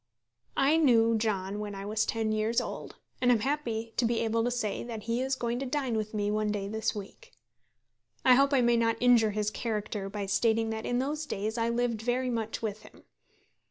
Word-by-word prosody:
I 290 +4 +4
knew 230 -7 +4
John 205 -2 -1
when 205 -1 -5
I 195 0 -6
was 215 +1 0
ten 225 -1 0
years 215 +2 +1
old, - - -6 0.3
and 250 -1 +4
am 230 -3 +3
happy 230 -4 -2
to - - +2
be 230 0 +1
able 225 0 +1
to 240 - +1
say 240 -4 -2
that 225 -3 -6
he 230 +3 -1
is 265 +1 0
going 240 -1 -2
to 270 - -3
dine 265 -3 -1
with 215 0 -3
me 205 0 0
one 215 0 0
day 200 -1 -3
this 220 +2 -2
week. 215 - -9 0.9
I 255 - +8
hope 275 +2 +4
I 270 -3 +4
may 240 -1 +3
not 230 -1 +2
injure 240 -3 +5
his 210 0 -1
character 210 -4 -3
by 200 0 -4
stating 225 +3 +1
that 220 0 -4
in 245 - 0
those 295 +4 -2
days 215 -1 -3
I 230 -1 0
lived 235 -2 0
very 250 +2 0
much 225 -1 -3
with 215 -1 -3
him. - - -17
225 Hz, 215 wpm, -29 LUFS, 215-245 Hz, 0.9 s, I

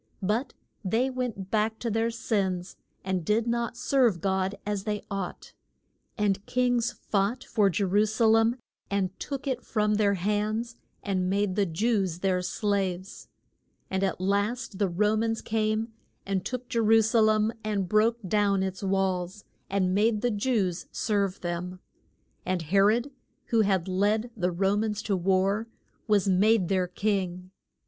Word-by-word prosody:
But 215 +8 -1 0.3
they 230 +7 +1
went 240 -7 -4
back 220 0 +1
to 230 0 -3
their 225 +2 +1
sins, 195 -5 -2 0.3
and 190 -2 -1
did 215 +6 +1
not 235 -1 -1
serve 245 -10 +2
God 190 +1 0
as 205 -2 -2
they 210 -1 -2
ought. 195 -2 -5 0.6
And 200 -2 +1
kings 245 -1 +1
fought 210 +5 -1
for 210 -4 +2
Je 195 +3 0
ru 205 +3 +3
sa 220 +2 +1
lem 225 +1 +4 0.3
and 195 -2 0
took 275 -1 -5
it 255 -3 -2
from 210 -1 0
their 205 -1 +2
hands 210 +5 -1 0.3
and 185 -3 0
made 200 -1 0
the 200 -2 +2
Jews 190 -1 0
their 185 -2 +1
slaves. 190 -1 -2 0.6
And 190 0 0
at 190 -3 -1
last 205 +3 -1
the 200 -3 +2
Ro 210 +5 +2
mans 225 +1 0
came 220 +1 -1 0.3
and 195 -2 -1
took 250 -1 -5
Je 230 - -1
ru 225 0 +5
sa 220 +2 +2
lem 215 0 +3
and 205 -3 -1
broke 215 +4 +3
down 200 -1 +2
its 190 0 -4
walls, 190 0 -1 0.3
and 185 -2 +1
made 210 +2 +2
the 245 - +1
Jews 205 -5 0
serve 200 -3 -1
them. 180 +1 -4 0.6
And 185 -2 -1
He 185 +6 +2
rod, 230 +7 +3 0.4
who 230 -1 +4
had 195 -4 +1
led 210 +5 +1
the 180 -4 0
Ro 195 +3 +1
mans 210 0 -1
to 205 - 0
war, 190 +4 +1 0.4
was 205 -3 +3
made 195 0 +3
their 185 -2 +1
king. 185 -2 -2
205 Hz, 160 wpm, -27 LUFS, 190-225 Hz, 0.6 s, ru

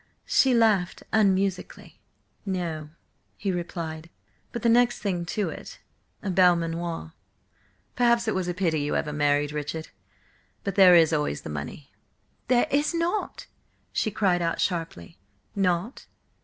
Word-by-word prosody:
She 260 -2 +3
laughed 215 -6 +2
unmusically. 195 -3 0 0.4
"No," 170 -6 -3 0.5
he 200 - -2
replied, 170 -2 -5 0.4
"but 235 - -6
the - - +3
next 240 +1 +4
thing 180 -4 -2
to 210 +3 -1
it: - - -9 0.5
a 200 - -1
Belmanoir. 170 -2 +1 0.8
Perhaps 235 -1 +3
it 220 - +1
was 185 -1 -2
a 175 - -1
pity 170 -5 0
you 145 - -1
ever 150 - -1
married 145 0 +1
Richard. 150 +2 -5 0.7
But 200 - -2
there 185 -2 +7
is 165 -1 +5
always 150 - -1
the - - -7
money." 75 - -7 0.6
"There 245 -1 +3
is 290 +4 +1
not," 345 +5 -2 0.5
she - - 0
cried 190 -4 +1
out 165 -1 -1
sharply. 165 - -3 0.4
"Not? 190 +4 -1
180 Hz, 135 wpm, -26 LUFS, 160-210 Hz, 0.8 s, there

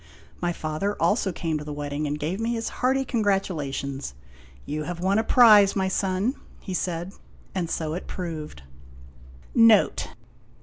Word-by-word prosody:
My 175 -1 +1
father 165 +5 -3
also 205 -2 +2
came 160 -2 -2
to - - -7
the 150 - -7
wedding 145 0 -3
and 145 +1 -2
gave 160 +7 -3
me 230 +1 -1
his 230 -1 -2
hearty 265 +1 +2
congratulations. 160 - -2 0.2
" 65 0 -23
You 150 +1 -3
have 175 +2 -5
won 195 +4 +2
a - - +1
prize, 215 -5 +7
my 190 -1 +1
son," 190 +5 0 0.3
he 190 - -6
said. 175 +1 -3 0.4
And 175 -3 -2
so 155 -2 -2
it 180 - -5
proved. 155 - -6 0.9
NOTE. 230 -2 +5
180 Hz, 160 wpm, -25 LUFS, 150-205 Hz, 0.9 s, prize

